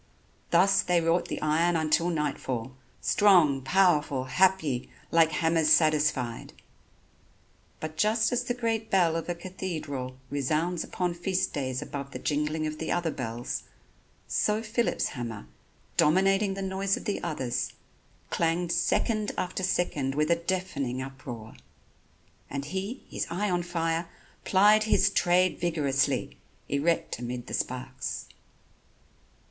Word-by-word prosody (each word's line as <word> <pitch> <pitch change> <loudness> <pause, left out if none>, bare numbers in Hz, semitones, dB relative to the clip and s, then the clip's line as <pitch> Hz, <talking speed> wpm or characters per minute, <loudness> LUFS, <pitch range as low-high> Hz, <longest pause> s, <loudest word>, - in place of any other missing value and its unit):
Thus 195 +3 +5
they 180 -1 +2
wrought 165 +1 +1
the - - -4
iron 165 +3 +2
until 160 +2 +2
nightfall, 135 -6 -2 0.3
strong, 175 -10 +4
powerful, 150 -4 +2
happy, 150 -2 +2 0.2
like 165 -1 +5
hammers 160 0 +2
satisfied. 150 -7 +2 1.3
But 155 0 -6
just 215 +3 +2
as 245 0 +1
the 245 0 -2
great 225 -2 -1
bell 175 -4 +3
of 165 +1 -3
a 175 - -1
cathedral 155 -8 -5
resounds 155 +5 0
upon 180 -1 -2
feast 180 +2 -1
days 130 -1 -2
above 140 -2 -6
the - - -4
jingling 150 +1 -1
of 155 0 -4
the 160 - -3
other 175 -2 0
bells, 120 -2 -4 0.6
so 210 +1 +1
Phillip's 230 +2 0
hammer, 115 -4 -6 0.5
dominating 195 +5 +3
the 195 - -4
noise 195 +1 0
of - - -9
the 205 - -2
others, 135 -8 -2 0.6
clanged 170 +1 0
second 215 +3 +1
after 185 +1 -2
second 150 -7 0
with 150 +2 +1
a - - +6
deafening 170 -8 -2
uproar. 130 -4 -7 1.0
And 140 0 -4
he, 190 - -4
his - - -3
eye 195 +3 -1
on 175 0 +1
fire, 165 -1 -1 0.4
plied 210 +3 +5
his 210 -2 +3
trade 180 -1 +2
vigorously, 145 -6 0 0.3
erect 145 -1 0
amid 120 0 -5
the - - -8
sparks. 130 +1 -3
165 Hz, 130 wpm, -28 LUFS, 140-190 Hz, 1.3 s, a